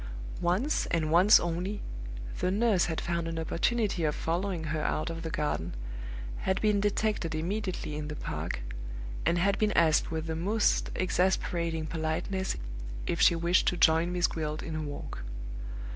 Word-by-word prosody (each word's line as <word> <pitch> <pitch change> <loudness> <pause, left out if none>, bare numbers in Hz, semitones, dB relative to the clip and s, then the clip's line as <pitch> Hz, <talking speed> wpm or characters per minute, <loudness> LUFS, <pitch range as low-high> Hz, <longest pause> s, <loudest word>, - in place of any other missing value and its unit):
Once 190 - +1
and 160 -2 0
once 180 +6 +8
only, 175 +4 -2 0.6
the 180 - +1
nurse 205 -1 +3
had 160 -2 -2
found 170 -1 -1
an 165 0 -3
opportunity 195 +4 0
of 150 -1 +1
following 175 +1 -1
her 155 0 -1
out 155 +2 0
of 165 0 -5
the 165 - -3
garden, 120 - -2 0.6
had 190 - 0
been 210 -1 +3
detected 205 -5 0
immediately 185 -1 -2
in 150 0 -4
the 150 - -5
park, - - -4 0.7
and 170 - +3
had 195 +3 +2
been 215 -1 +3
asked 160 -2 +4
with 160 -1 -2
the 160 -1 -2
most 205 +7 +2
exasperating 175 -3 +1
politeness 160 +4 -2 0.5
if - - -1
she 170 - +7
wished 170 +2 +3
to 180 - +2
join 165 +1 +4
Miss 180 0 +2
Gwilt 155 -1 -2
in 160 - -4
a 155 - -2
walk. 145 -1 -6
170 Hz, 160 wpm, -30 LUFS, 160-190 Hz, 0.7 s, once